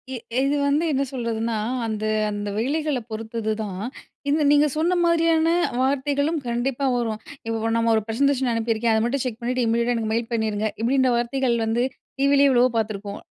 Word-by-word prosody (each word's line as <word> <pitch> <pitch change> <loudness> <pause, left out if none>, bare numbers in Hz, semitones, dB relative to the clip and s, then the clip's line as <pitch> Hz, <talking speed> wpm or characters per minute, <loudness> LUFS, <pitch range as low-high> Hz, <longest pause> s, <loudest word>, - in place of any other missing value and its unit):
எ - - -3 0.3
இது 280 +2 +1
வந்து 290 +3 +2
என்ன 275 -1 +1
சொல்றதுன்னா 230 -2 -2 0.3
அந்த, 215 -1 -3 0.3
அந்த 205 0 -4
வேலைகள 290 +4 0
பொறுத்தது 220 0 -3
தான். 195 -3 -5 0.5
இந்த 305 +2 +2
நீங்க 295 +1 +5
சொன்ன 325 +4 +1
மாதிரியான 330 -1 +3 0.3
வார்த்தைகளும் 285 +4 +1
கண்டிப்பா 240 +3 -1
வரும். 225 -3 -1 0.3
"இப்ப 225 0 -1
நம்ம 230 0 +2
ஒரு 220 - +2
பிரசன்டேஷன் 265 +3 +1
அனுப்பியிருக்கேன். 230 0 0
அத 220 - +2
மட்டும் 265 +2 -1
செக் 240 -3 -4
பண்ணீட்டு 250 +1 0
இமிடியட்டா 235 +2 +1
எனக்கு 220 -1 -2
மெயில் 230 +1 -1
பண்ணீருங்க." 220 -2 0
இப்பிடீன்ற 260 +2 +2
வார்த்தைகள் 240 +1 0
வந்து 230 +2 +1 0.4
டிவிலே 280 0 +5
எவ்வளவோ 250 -1 +4
பார்த்துருப்போம். 205 -2 -3
240 Hz, 160 wpm, -23 LUFS, 225-275 Hz, 0.5 s, நீங்க